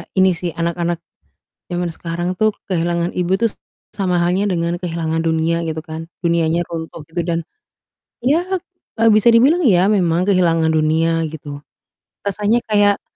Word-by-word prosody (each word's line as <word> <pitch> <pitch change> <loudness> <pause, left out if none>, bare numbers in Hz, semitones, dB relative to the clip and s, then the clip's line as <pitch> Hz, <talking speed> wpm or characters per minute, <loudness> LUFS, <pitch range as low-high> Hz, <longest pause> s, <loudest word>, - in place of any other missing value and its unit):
ini 190 -1 +5
sih 170 -1 -4
anak-anak 170 0 -2 0.6
zaman 175 -1 -2
sekarang 170 +1 -4
tuh 215 -1 +2 0.2
kehilangan 170 -1 0
ibu 180 +1 0
tuh 230 +3 +1
s - - -24 0.3
sama 180 -3 0
halnya 180 +4 +1
dengan 170 -2 -1
kehilangan 165 -2 -2
dunia 165 +1 0
gitu 160 -1 -3
kan, 160 +1 -7 0.2
dunianya 170 0 +1
runtuh 165 -1 -6
gitu 170 0 -3
dan 170 -1 -1 0.8
ya, 295 +8 +2 0.6
eee, 225 - +6
bisa 215 +2 +5
dibilang 290 +9 +4
ya 190 -4 +4
memang 175 -5 +2
kehilangan 165 -4 +3
dunia 160 +1 +2
gitu, 145 -2 -8 0.6
rasanya 210 +4 0
kayak, 205 -1 +3
170 Hz, 145 wpm, -19 LUFS, 165-195 Hz, 0.8 s, eee